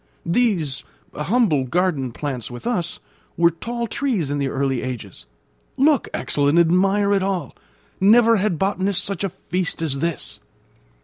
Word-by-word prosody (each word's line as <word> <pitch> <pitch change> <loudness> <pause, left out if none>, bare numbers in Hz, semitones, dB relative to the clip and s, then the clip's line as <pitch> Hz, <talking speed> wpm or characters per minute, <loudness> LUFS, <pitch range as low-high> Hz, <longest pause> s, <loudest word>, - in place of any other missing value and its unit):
These, 170 - +1 0.3
humble 155 - +1
garden 155 -4 0
plants 130 -3 -4
with 120 -1 -9
us, 180 -9 -1 0.4
were 170 0 +5
tall 235 +8 -4
trees 225 - -1
in 145 - -1
the 140 - 0
early 135 -2 -1
ages. 105 - -7 0.5
Look, 285 -1 +3
Axel, 145 -1 0
and 145 +4 +3
admire 195 +4 +3
it 195 - +2
all. 190 -2 -2 0.4
Never 225 +3 +6
had 195 -3 0
botanist 195 0 0
such 200 -1 -3
a 195 - 0
feast 180 -1 -3
as 150 -4 -2
this!" 170 +1 -3
175 Hz, 145 wpm, -22 LUFS, 145-200 Hz, 0.5 s, Never